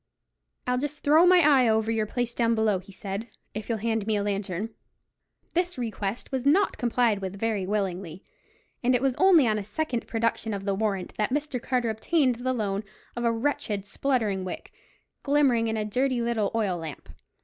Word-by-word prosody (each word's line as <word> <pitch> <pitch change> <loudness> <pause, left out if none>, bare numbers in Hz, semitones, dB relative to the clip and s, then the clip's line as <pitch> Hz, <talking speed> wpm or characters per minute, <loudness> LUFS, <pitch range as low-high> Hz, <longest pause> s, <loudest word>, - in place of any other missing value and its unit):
"I'll 250 0 +1
just 295 +2 -5
throw 315 +5 +6
my 365 0 +7
eye 275 -6 +5
over 220 0 +2
your 220 -1 0
place 245 +1 -2
down 230 -1 +2
below," 215 -3 +2
he 190 +2 -14
said, 200 +3 -5 0.3
"if 215 +2 -6
you'll 230 - 0
hand 225 -1 -1
me 220 - +2
a 205 - 0
lantern." 200 +1 -2 0.8
This 355 -1 0
request 220 -2 -4
was 260 -2 -1
not 315 +9 +3
complied 240 -3 +2
with 195 0 -5
very 215 -4 -1
willingly; 190 -3 -3 0.6
and 250 +1 +3
it 245 - +1
was 270 -2 +2
only 370 -7 +6
on 215 -1 +1
a - - -4
second 240 +3 -3
production 225 -1 -1
of 195 0 -6
the 200 - +1
warrant 195 -2 -2
that 210 - +1
Mr. 285 -2 -2
Carter 245 -3 0
obtained 255 +3 +1
the 255 +2 -1
loan 205 -4 -1 0.3
of 240 - -3
a 235 - +4
wretched 225 -5 -1
spluttering 210 -4 0
wick, 185 - -7 0.5
glimmering 275 -5 +3
in 220 0 -1
a 215 - -1
dirty 255 +4 0
little 235 -4 0
oil 200 -6 0
lamp. 160 -3 -8
225 Hz, 190 wpm, -27 LUFS, 205-255 Hz, 0.8 s, my